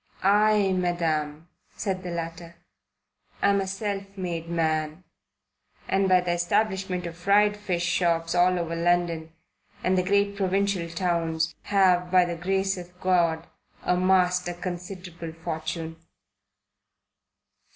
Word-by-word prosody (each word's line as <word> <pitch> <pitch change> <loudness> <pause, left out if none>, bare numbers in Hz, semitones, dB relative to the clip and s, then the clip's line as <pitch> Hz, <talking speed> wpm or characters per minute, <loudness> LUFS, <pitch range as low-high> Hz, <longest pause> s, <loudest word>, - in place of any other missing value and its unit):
"I, 205 0 +4
Madam," 165 -4 -1 0.3
said 190 -3 -2
the 180 - -6
latter, 170 0 -6 0.9
"am 200 0 +4
a 190 - -3
self 195 0 -3
made 170 -3 -4
man, 160 0 -1 0.8
and 190 0 +2
by 185 -1 +5
the 180 -1 -1
establishment 190 0 0
of 170 -1 -6
fried 205 +4 +3
fish 180 -4 -2
shops 170 -2 +1
all 180 +1 +4
over 170 -1 -2
London 170 -1 0 0.5
and 185 - +2
the 185 - +3
great 200 +2 +1
provincial 195 -2 0
towns, 165 -2 -1
have, 185 -3 +3
by 180 0 +5
the 175 -1 -3
grace 190 +2 0
of 180 0 -12
God, 170 -3 +2 0.4
amassed 180 0 +2
a 175 - -3
considerable 180 -2 -7
fortune." 160 0 -5
180 Hz, 120 wpm, -26 LUFS, 170-190 Hz, 0.9 s, by